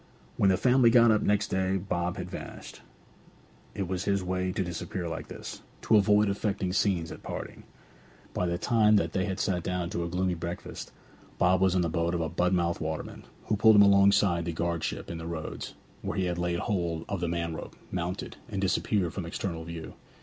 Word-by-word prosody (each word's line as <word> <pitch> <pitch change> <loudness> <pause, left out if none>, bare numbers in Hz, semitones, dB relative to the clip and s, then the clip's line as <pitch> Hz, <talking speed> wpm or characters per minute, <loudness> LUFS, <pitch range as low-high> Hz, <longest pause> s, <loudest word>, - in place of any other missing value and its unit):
When 100 - +3
the 95 - +3
family 125 +1 +5
got 115 -1 +6
up 110 - +3
next 105 +1 +1
day 95 0 +1
Bob 90 -2 -2
had - - -4
vanished. - - -8 0.9
It 100 -3 -2
was 95 +1 -3
his 100 -2 +1
way 90 0 -1
to 95 - -1
disappear 85 +1 -4
like 80 0 -5
this, - - -8 0.2
to 115 - +4
avoid 105 0 +5
affecting 100 -2 -1
scenes 90 -5 +1
at - - -9
parting. - - -7 0.7
By 90 - 0
the 85 0 -1
time 110 +1 +4
that 100 - +1
they 95 -1 +1
had 95 -2 -3
sat 90 -3 0
down 90 0 -2
to 85 - -2
a 85 - -3
gloomy 90 +1 0
breakfast, 85 +1 -6 0.5
Bob 90 +1 +3
was 95 -1 +3
in 90 - +3
the 85 - +1
boat 85 +1 0
of 85 - -1
a 80 - -1
Budmouth 85 -1 +1
waterman, 80 0 -5 0.2
who 105 - +1
pulled 110 +1 +6
him 100 - +8
alongside 100 -3 +4
the 85 - -2
guardship 85 +1 -2
in 85 - -5
the 80 - -6
roads, 80 -2 -5 0.3
where - - -3
he 90 -2 +1
laid 85 0 -1
hold 85 -5 -1
of 100 - -2
the 85 - 0
man 85 -1 -2
rope, - - -8 0.2
mounted, 90 +1 -4
and 100 -3 -3
disappeared 95 -1 +1
from 95 -4 -4
external 85 -1 -4
view. 85 -1 -7
90 Hz, 200 wpm, -28 LUFS, 85-100 Hz, 0.9 s, him